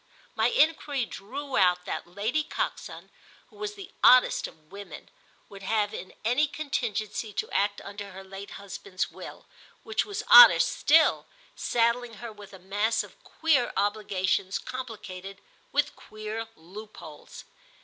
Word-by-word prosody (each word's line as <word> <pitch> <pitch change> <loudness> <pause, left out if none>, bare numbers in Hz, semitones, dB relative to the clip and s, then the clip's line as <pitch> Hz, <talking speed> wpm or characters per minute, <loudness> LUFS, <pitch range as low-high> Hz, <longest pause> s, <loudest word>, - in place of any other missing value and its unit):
My - - +2
enquiry 305 - +2
drew 265 +8 -6
out 180 -2 +3
that - - -4
Lady 215 - -1
Coxon, - - -5 0.4
who - - -20
was 415 0 -5
the 395 -3 -10
oddest 255 0 +6
of 155 0 -19
women, 200 0 -10 0.4
would 200 -1 -12
have 205 +1 0
in 185 - -8
any 250 +7 +3
contingency 235 -7 -3
to - - -3
act 205 0 +1
under 200 0 -8
her 190 0 -10
late 195 +1 -9
husband's 200 -1 -5
will, - - -10 0.4
which 435 - 0
was 415 +1 -5
odder 485 - +11
still, 315 +1 +3 0.3
saddling 235 0 0
her 230 +3 -8
with 205 -1 -13
a 195 - -11
mass 205 +5 0
of - - -16
queer 290 -7 +1
obligations 195 -2 0
complicated 210 -7 -8 0.3
with - - +1
queer 215 +1 -7
loopholes. 180 -3 -11
215 Hz, 140 wpm, -27 LUFS, 195-255 Hz, 0.4 s, odder